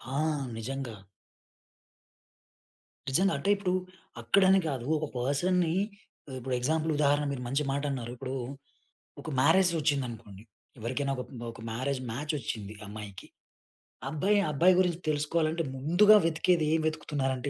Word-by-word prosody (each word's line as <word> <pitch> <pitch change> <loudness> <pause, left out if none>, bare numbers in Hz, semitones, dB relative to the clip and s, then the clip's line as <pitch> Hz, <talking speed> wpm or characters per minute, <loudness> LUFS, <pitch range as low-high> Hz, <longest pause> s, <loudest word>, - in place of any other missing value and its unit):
ఆ! - - 0 0.4
నిజంగా. 125 0 -5 2.1
నిజంగా 190 +9 +3
అంటే 200 - -2
ఇప్పుడు 195 -2 -2 0.5
అక్కడ 190 +12 +3
అని 195 - +6
గాదు. 130 -5 -3
ఒక 155 - -2
పర్సన్‌ని 160 +7 +1 0.6
ఉ - - -8
ఇప్పుడు 130 +1 -4
ఎగ్జాంపుల్ 160 +5 0
ఉదాహరణ 145 0 +3
మీరు 125 -2 -4
మంచి 140 +4 0
మాట 140 +1 -1
అన్నారు. 120 -3 -4
ఇప్పుడు 130 +1 -5 0.9
ఒక 160 - -7
మ్యారేజ్ 170 +6 +5
వచ్చిందనుకోండి, 120 -9 -2 0.4
ఎవరికైనా 130 +5 -2
ఒక, 125 - -3 0.3
ఒక 115 - -13
మ్యారేజ్ 130 +3 -2
మ్యాచ్ 145 +6 -3
వచ్చింది 110 -4 -5
అమ్మాయికి. 105 -2 -9 0.8
అబ్బాయి, 190 +9 +2
అబ్బాయి 175 +6 +5
గురించి 175 -2 +1
తెలుసుకోవాలంటే 155 +2 +1
ముందుగా 175 +10 +6
వెతికేది 165 +1 +2
ఏం 160 - +2
వెతుకుతున్నారంటే 135 -4 -2
140 Hz, 125 wpm, -29 LUFS, 125-165 Hz, 2.1 s, అని